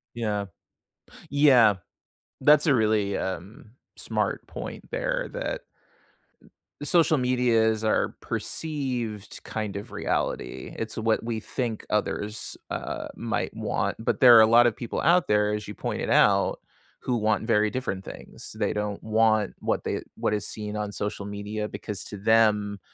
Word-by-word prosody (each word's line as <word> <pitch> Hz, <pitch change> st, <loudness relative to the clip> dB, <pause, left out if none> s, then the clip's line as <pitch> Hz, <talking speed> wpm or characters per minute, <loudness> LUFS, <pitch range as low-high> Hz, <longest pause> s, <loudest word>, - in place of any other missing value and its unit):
Yeah. 105 Hz, -3 st, -1 dB, 0.9 s
Yeah. 130 Hz, -7 st, +6 dB, 0.7 s
That's 150 Hz, +1 st, +5 dB
a 150 Hz, -, +5 dB
really, 105 Hz, -3 st, +2 dB
um, 95 Hz, +3 st, -6 dB, 0.2 s
smart -, -, -2 dB
point -, -, -8 dB
there -, -, -1 dB
that -, -, -3 dB, 1.2 s
social 160 Hz, +1 st, +4 dB
media 125 Hz, -3 st, +2 dB
is 110 Hz, 0 st, -2 dB
our 110 Hz, -, +1 dB
perceived 125 Hz, -9 st, -4 dB
kind 105 Hz, -2 st, -4 dB
of 100 Hz, -, -7 dB
reality. -, -, -3 dB
It's 115 Hz, 0 st, -4 dB
what 110 Hz, 0 st, +1 dB
we 115 Hz, -2 st, -2 dB
think 115 Hz, -2 st, -4 dB
others, 105 Hz, 0 st, -2 dB
uh, -, -, -4 dB
might -, -, -3 dB
want, -, -, -1 dB
but 115 Hz, -, -1 dB
there 125 Hz, -3 st, +9 dB
are 110 Hz, -, +9 dB
a 110 Hz, -, +7 dB
lot 120 Hz, +2 st, +6 dB
of 115 Hz, -, +1 dB
people 120 Hz, -, -4 dB
out 175 Hz, +2 st, +3 dB
there, 105 Hz, 0 st, +2 dB
as 105 Hz, 0 st, -4 dB
you 105 Hz, -, -7 dB
pointed -, -, -3 dB
out, -, -, +4 dB, 0.4 s
who 125 Hz, -, -1 dB
want 110 Hz, 0 st, +1 dB
very 105 Hz, -2 st, +3 dB
different 100 Hz, -7 st, -3 dB
things. -, -, -9 dB
They 105 Hz, -2 st, 0 dB
don't 105 Hz, -1 st, -3 dB
want 110 Hz, -2 st, +2 dB
what -, -, -1 dB
they -, -, -2 dB
what 105 Hz, -, 0 dB
is 105 Hz, -1 st, -2 dB
seen 105 Hz, -1 st, -5 dB
on 105 Hz, -1 st, -2 dB
social 105 Hz, 0 st, -3 dB
media 105 Hz, +1 st, -4 dB
because 105 Hz, -4 st, -5 dB
to 105 Hz, -, -7 dB
them, 105 Hz, -1 st, +2 dB
110 Hz, 150 wpm, -26 LUFS, 105-125 Hz, 1.2 s, there